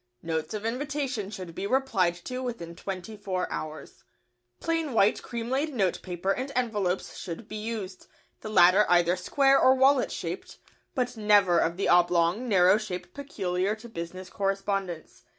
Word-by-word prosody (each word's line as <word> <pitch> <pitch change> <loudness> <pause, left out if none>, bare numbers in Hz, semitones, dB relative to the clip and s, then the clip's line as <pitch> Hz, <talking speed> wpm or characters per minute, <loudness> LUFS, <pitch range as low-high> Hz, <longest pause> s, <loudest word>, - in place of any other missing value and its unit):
Notes 165 +4 -3
of 210 +1 -5
invitation 265 -3 -2
should 185 -5 -7
be 200 - -4
replied 210 -9 +1
to 255 0 -4
within 200 -10 -5
twenty 195 +4 -6
four 190 -3 -3
hours. 155 0 -6
[Sidenote: - - -29
Writing - - -44
materials.] 120 0 -30
Plain 330 -4 -1
white 200 -1 +3
cream 235 -1 -5
laid 285 +3 0
notepaper 185 -2 -1
and 255 +6 -2
envelopes 210 -7 -1
should 185 +4 -7
be 215 - -6
used, 210 -4 -5 0.3
the 215 - -7
latter 195 0 +6
either 175 0 +4
square 270 +9 +3
or 260 - +6
wallet 265 0 +4
shaped, - - -6 0.4
but 250 -2 -1
never 205 -5 +4
of 170 +1 0
the 195 - 0
oblong, 175 +6 +3
narrow 190 0 +5
shape 180 -4 -6
peculiar 195 -8 -2
to 220 +2 -12
business 185 -2 -7
correspondence. 195 -3 -3
200 Hz, 165 wpm, -27 LUFS, 180-240 Hz, 0.4 s, latter